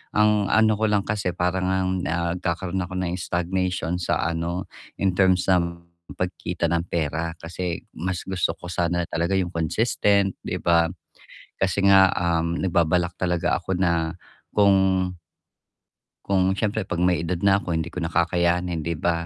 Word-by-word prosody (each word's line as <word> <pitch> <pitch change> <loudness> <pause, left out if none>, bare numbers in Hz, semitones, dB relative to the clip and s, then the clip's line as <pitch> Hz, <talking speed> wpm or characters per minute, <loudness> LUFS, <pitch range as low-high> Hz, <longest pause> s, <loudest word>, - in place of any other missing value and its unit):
Ang 105 -1 +3
ano 110 0 +4
ko 110 - +2
lang 100 -1 +2
kasi 100 -3 -1
para 90 +1 0
ngang 95 0 0 0.4
ngkakaroon 90 +1 -2
ako 90 +1 -8
ng 90 -1 -1
stagnation 90 0 -1
sa 90 - 0
ano 85 +3 -2 0.3
in 95 -2 +1
terms 95 -1 +3
ng 85 -1 0 0.3
pagkita 90 -1 -2
ng 85 0 0
pera 80 +1 -1
kasi 85 0 -4
mas 90 +2 -3
gusto 95 -2 0
ko 90 - -9
sana 85 -1 -1
talaga 85 +3 -1
yung 90 -2 0
consistent 100 +3 +1
'di - - -3
ba? 85 -1 +3 0.7
Kasi 95 +1 0
nga, 95 -1 +7
um, 85 -1 0
nagbabalak 85 -1 +1
talaga 90 -2 0
ako 95 - -3
na 85 -2 0 0.4
kung 95 -2 +3 1.1
kung 95 -1 +2
siyempre 105 0 -1
'pag 85 -2 -3
may 90 -2 +2
edad 85 0 -2
na 100 0 +4
ako 90 -3 -3
hindi 80 0 -1
ko 90 - -11
na 80 - -2
kakayanin 85 0 +1
'di 85 0 -1
ba? 85 +1 0
90 Hz, 155 wpm, -24 LUFS, 85-95 Hz, 1.1 s, nga